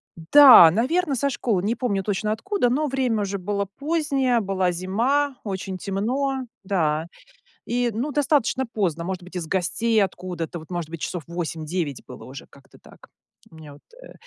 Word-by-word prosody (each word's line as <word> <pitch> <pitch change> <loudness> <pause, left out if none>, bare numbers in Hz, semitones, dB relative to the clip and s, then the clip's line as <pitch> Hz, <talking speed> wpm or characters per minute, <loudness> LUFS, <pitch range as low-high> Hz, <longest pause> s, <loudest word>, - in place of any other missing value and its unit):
Да, 175 - +8
наверно, 275 - 0
со 280 +3 0
школы. 220 -8 -1
Не 220 +4 0
помню 210 -6 -1
точно, 210 +2 -1
откуда, 380 - 0
но 290 +5 0
время 255 -5 0
уже 200 0 -3
было 200 +2 -2
позднее. 275 - 0
Была 190 -2 0
зима, 245 +11 0
очень 190 -2 -5
темно. 255 +8 -2 0.2
Да. 165 -5 0 0.6
И, 245 0 0
ну, 240 +8 -3
достаточно 280 -2 +1
поздно, 185 -8 -2
может 185 0 -5
быть, 180 +1 -14
из 170 -3 -4
гостей 215 +5 +1
откуда-то, 175 -3 -5
вот, 160 - -14
может 175 -3 -4
быть, 165 -1 -8
часов 175 -3 -4
8-9 165 -3 -4
было 125 - -11
уже. 135 +1 -10
Как-то 140 - -19
так. - - -18 0.4
У - - -17
меня 155 -2 -12
вот, 145 - -17 0.2
э, - - -13
200 Hz, 170 wpm, -23 LUFS, 175-255 Hz, 0.6 s, Да